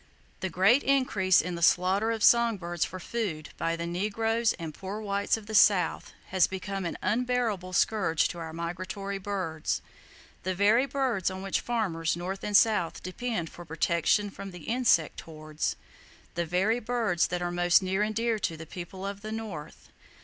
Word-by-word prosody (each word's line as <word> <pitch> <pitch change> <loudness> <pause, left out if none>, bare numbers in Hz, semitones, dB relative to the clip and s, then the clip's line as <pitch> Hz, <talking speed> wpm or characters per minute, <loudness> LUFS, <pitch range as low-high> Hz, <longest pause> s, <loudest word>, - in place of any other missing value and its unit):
[Page - - -31
x] - - -33
The 190 - -2
great 195 - +4
increase 220 -10 +3
in 180 +2 -4
the 170 - -5
slaughter 185 +5 +3
of 225 -2 -1
song 235 -2 +5
birds 175 -2 -2
for 185 - -5
food, 180 -7 -3
by 165 0 0
the 170 0 -4
negroes 220 +6 0
and 165 -3 -7
poor 195 +5 -6
whites 200 0 0
of 220 - -10
the 220 - -7
South, 205 -3 +4 0.2
has 185 -1 +4
become 195 0 -4
an - - -5
unbearable 225 -3 0
scourge 185 -4 +2
to 175 - -7
our 165 -1 -6
migratory 185 +4 -4
birds,—the 185 0 -5
very 215 +7 +4
birds 260 -10 0
on 190 0 -6
which 195 - -1
farmers 180 -10 -1
north 185 +3 -5
and 205 -1 +4
south 210 -8 +2
depend 185 -2 -3
for 175 - -10
protection 170 +5 +1
from 195 0 -8
the 180 -4 -11
insect 225 -9 +2
hordes,—the 155 +2 -6
very 195 +8 +1
birds 225 -7 +1
that 175 0 -3
are 175 - -1
most 175 +1 +4
near 190 +2 0
and 215 +1 0
dear 230 -1 0
to 165 -5 -2
the 160 - -8
people 180 +3 -8
of 200 0 -5
the 215 +1 -6
North. 215 -9 -7
190 Hz, 180 wpm, -28 LUFS, 175-220 Hz, 0.2 s, song